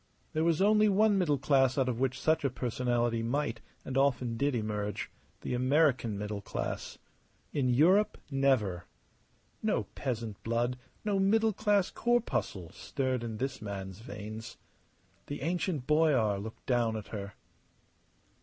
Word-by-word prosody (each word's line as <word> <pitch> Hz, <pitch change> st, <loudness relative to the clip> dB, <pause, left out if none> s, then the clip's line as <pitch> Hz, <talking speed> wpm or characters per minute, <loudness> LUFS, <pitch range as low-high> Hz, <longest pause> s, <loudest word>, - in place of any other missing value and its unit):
There 155 Hz, -, +1 dB
was 170 Hz, +2 st, +3 dB
only 215 Hz, +1 st, +5 dB
one 205 Hz, 0 st, +4 dB
middle 150 Hz, -6 st, +2 dB
class 135 Hz, 0 st, +3 dB
out 135 Hz, -2 st, +2 dB
of 120 Hz, -2 st, -1 dB
which 130 Hz, -1 st, 0 dB
such 160 Hz, -1 st, +2 dB
a 140 Hz, -, +2 dB
personality 120 Hz, -1 st, 0 dB
might, 115 Hz, -1 st, -1 dB, 0.2 s
and 130 Hz, -, -5 dB
often 130 Hz, -3 st, +2 dB
did, 140 Hz, +3 st, +1 dB
emerge 105 Hz, -2 st, -3 dB, 0.3 s
the -, -, -3 dB
American 130 Hz, -4 st, +2 dB
middle 105 Hz, 0 st, -4 dB
class. -, -, -4 dB, 0.6 s
In 130 Hz, -3 st, +1 dB
Europe, 185 Hz, +12 st, +4 dB
never. 125 Hz, -10 st, +1 dB, 0.8 s
No -, -, +1 dB
peasant 115 Hz, -6 st, -4 dB
blood, 120 Hz, +2 st, -1 dB, 0.3 s
no 205 Hz, -2 st, +1 dB
middle 220 Hz, +3 st, +3 dB
class 205 Hz, -2 st, +2 dB
corpuscle, 235 Hz, -, 0 dB
stirred 130 Hz, -3 st, -2 dB
in 115 Hz, -2 st, -4 dB
this 135 Hz, +1 st, -3 dB
man's 95 Hz, -2 st, -6 dB
veins. 110 Hz, 0 st, -8 dB, 0.7 s
The 145 Hz, -1 st, -5 dB
ancient 170 Hz, -4 st, -1 dB
boyar 135 Hz, -10 st, +3 dB
looked 110 Hz, +2 st, -8 dB
down 120 Hz, -3 st, +1 dB
at 105 Hz, -, -8 dB
her. 100 Hz, -2 st, -6 dB
130 Hz, 140 wpm, -31 LUFS, 110-155 Hz, 0.8 s, only